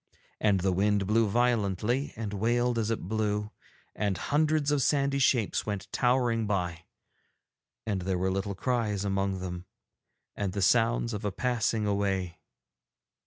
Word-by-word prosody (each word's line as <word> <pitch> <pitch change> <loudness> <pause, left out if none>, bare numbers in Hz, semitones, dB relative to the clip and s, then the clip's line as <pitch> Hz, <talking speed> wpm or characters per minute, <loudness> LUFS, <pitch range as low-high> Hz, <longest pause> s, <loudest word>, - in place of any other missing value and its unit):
And 100 -3 +2
the 95 +1 +2
wind 100 +2 +1
blew 110 +2 +3
violently, 120 +2 +1
and 105 -2 -5
wailed 120 +3 +1
as 110 -1 -1
it 115 - -1
blew, 105 0 -1 0.4
and 100 -3 -1
hundreds 150 - +1
of 145 -2 +2
sandy 140 0 +2
shapes 125 -5 +2
went 100 -3 -3
towering 120 -3 +1
by, 90 -4 -2 1.0
and 100 -3 -1
there 95 0 -1
were 95 +1 0
little 95 +1 -2
cries 105 -3 -1
among 95 -1 -1
them 90 -1 -5 0.7
and 100 -3 -2
the 100 - -2
sounds 115 +3 +2
of 105 +1 -4
a 105 - -1
passing 115 -1 0
away. 95 -4 -1
105 Hz, 145 wpm, -29 LUFS, 95-120 Hz, 1.0 s, blew